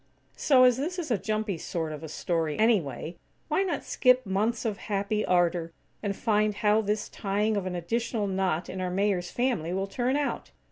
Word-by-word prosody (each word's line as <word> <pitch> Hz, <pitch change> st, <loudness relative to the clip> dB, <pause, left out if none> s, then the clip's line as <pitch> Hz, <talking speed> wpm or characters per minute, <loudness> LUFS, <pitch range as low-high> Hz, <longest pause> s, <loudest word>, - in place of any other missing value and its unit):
So, 260 Hz, -3 st, +5 dB
as 250 Hz, -1 st, +5 dB
this 330 Hz, +7 st, -3 dB
is 330 Hz, -7 st, -3 dB
a 230 Hz, -, +3 dB
jumpy 215 Hz, -4 st, -2 dB
sort 160 Hz, -1 st, -3 dB
of 150 Hz, -, -6 dB
a 160 Hz, -, -7 dB
story, 160 Hz, -1 st, -1 dB
anyway, 190 Hz, -, +1 dB, 0.3 s
why -, -, +2 dB
not 385 Hz, -2 st, -1 dB
skip 255 Hz, -1 st, +3 dB
months 215 Hz, +5 st, 0 dB
of 215 Hz, -3 st, -1 dB
happy 205 Hz, +1 st, 0 dB
ardor, 175 Hz, -2 st, +1 dB, 0.3 s
and 200 Hz, -2 st, -2 dB
find 210 Hz, -1 st, +1 dB
how 210 Hz, +1 st, +3 dB
this 210 Hz, 0 st, -1 dB
tying 210 Hz, +2 st, -1 dB
of 195 Hz, -2 st, -1 dB
an 180 Hz, -, -3 dB
additional 220 Hz, +5 st, -1 dB
knot 190 Hz, -3 st, 0 dB
in 185 Hz, -, -5 dB
our 180 Hz, -, -1 dB
Mayor's 185 Hz, -1 st, 0 dB
family 235 Hz, -10 st, -1 dB
will 190 Hz, +1 st, 0 dB
turn 245 Hz, +6 st, -1 dB
out? 290 Hz, -1 st, -2 dB
205 Hz, 190 wpm, -28 LUFS, 180-230 Hz, 0.3 s, So